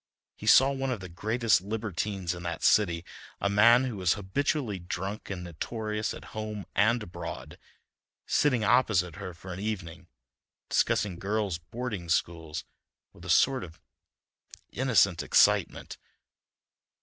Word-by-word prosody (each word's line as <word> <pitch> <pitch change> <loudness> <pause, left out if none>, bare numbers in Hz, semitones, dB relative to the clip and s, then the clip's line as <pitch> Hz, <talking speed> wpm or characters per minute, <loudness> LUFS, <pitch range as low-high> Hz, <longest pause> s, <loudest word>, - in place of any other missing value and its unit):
He - - -9
saw 135 +1 +7
one 135 -1 -2
of 125 -4 -2
the 90 -1 -8
greatest 110 +4 +1
libertines 100 -3 -3
in 85 - -8
that 85 -1 -5
city, 85 -5 +3 0.3
a 100 - 0
man 115 +5 +6
who 125 -5 -3
was 90 -2 +2
habitually 110 +2 -2
drunk 95 +4 -5
and 95 -3 -5
notorious 105 +5 -4
at - - -12
home 110 -2 -5
and 115 +3 +2
abroad, 85 - -8 0.7
sitting 130 -6 +2
opposite 105 -6 +2
her 95 -3 -7
for 90 +2 -9
an 90 - -7
evening, 100 -6 -5 0.6
discussing 95 -4 +1
girls' 100 -3 -1
boarding 105 0 -6
schools 80 -2 -1 0.5
with - - -14
a - - -7
sort 130 -2 +3
of 80 -2 -11 0.9
innocent 100 -9 +2
excitement. - - +2
105 Hz, 135 wpm, -28 LUFS, 90-115 Hz, 0.9 s, saw